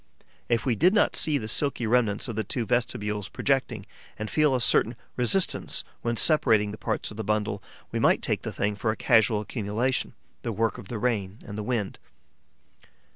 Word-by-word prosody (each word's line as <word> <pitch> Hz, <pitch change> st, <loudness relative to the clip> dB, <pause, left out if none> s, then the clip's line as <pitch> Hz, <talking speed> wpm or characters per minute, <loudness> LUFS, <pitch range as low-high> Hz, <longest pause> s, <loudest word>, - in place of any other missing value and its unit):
If 120 Hz, 0 st, +1 dB
we 125 Hz, -, +2 dB
did 180 Hz, -, +3 dB
not 210 Hz, -, +3 dB
see 150 Hz, -2 st, +2 dB
the 110 Hz, -, -5 dB
silky 135 Hz, +1 st, +1 dB
remnants 110 Hz, -2 st, +1 dB
of 115 Hz, -, -5 dB
the 110 Hz, -, -1 dB
two 115 Hz, +4 st, -2 dB
vestibules 105 Hz, -4 st, -1 dB
projecting 130 Hz, -7 st, -1 dB, 0.3 s
and 110 Hz, 0 st, -5 dB
feel 150 Hz, -3 st, +3 dB
a -, -, +1 dB
certain 115 Hz, 0 st, +3 dB, 0.2 s
resistance 150 Hz, +10 st, +1 dB, 0.2 s
when 115 Hz, 0 st, -1 dB
separating 110 Hz, -10 st, +3 dB
the 105 Hz, -, -8 dB
parts -, -, -2 dB
of 105 Hz, -, -10 dB
the 110 Hz, -, -3 dB
bundle, 105 Hz, 0 st, -1 dB, 0.3 s
we -, -, -2 dB
might -, -, +3 dB
take -, -, 0 dB
the -, -, -5 dB
thing 105 Hz, +1 st, -1 dB
for 105 Hz, +2 st, -2 dB
a 110 Hz, -, 0 dB
casual 110 Hz, -2 st, +3 dB
accumulation, 110 Hz, +4 st, -2 dB, 0.3 s
the 115 Hz, -, -3 dB
work 115 Hz, +1 st, -1 dB
of -, -, -10 dB
the 115 Hz, -, -4 dB
rain 105 Hz, -4 st, -1 dB
and 100 Hz, -, -7 dB
the 105 Hz, -, -3 dB
wind. 105 Hz, -3 st, -2 dB
110 Hz, 190 wpm, -26 LUFS, 105-125 Hz, 0.3 s, did